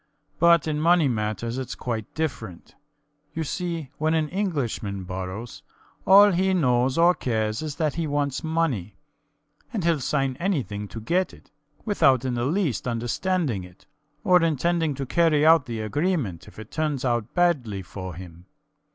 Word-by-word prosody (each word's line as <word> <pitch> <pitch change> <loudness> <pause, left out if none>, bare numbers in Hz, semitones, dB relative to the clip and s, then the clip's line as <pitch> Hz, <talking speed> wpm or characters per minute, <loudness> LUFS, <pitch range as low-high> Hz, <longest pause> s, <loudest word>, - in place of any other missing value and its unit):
But 170 -2 +5
in 150 -1 -1
money 170 -2 +4
matters 115 +1 -2
it's 125 -3 -5
quite 115 -4 -4
different. 115 - -5 0.6
You 160 - -1
see, 165 -2 -4
when 155 +1 +1
an 155 -2 0
Englishman 135 - -2
borrows, 95 +5 -6 0.5
all 200 +2 +8
he 190 +1 +1
knows 130 -4 +2
or 170 +2 +6
cares 110 -7 -2
is 155 -2 -4
that 155 -1 0
he 165 -1 -2
wants 145 -2 -1
money; 160 - -1 0.8
and 215 -7 -3
he'll 165 -2 +2
sign 135 -1 -1
anything 130 - -2
to 115 - -8
get 180 +11 0
it, - - -22 0.3
without 135 - +3
in 130 - -1
the 120 0 -1
least 150 - -1
understanding 120 - -1
it, 90 +1 -16 0.4
or 180 -1 +5
intending 165 -1 +1
to 135 0 -4
carry 155 +1 +3
out 160 -4 +5
the 115 -2 -4
agreement 130 - -2
if - - -15
it 110 0 -10
turns 150 -4 -1
out 120 -2 -1
badly 130 - +1
for 95 -1 -7
him. 90 0 -11
140 Hz, 160 wpm, -25 LUFS, 110-165 Hz, 0.8 s, all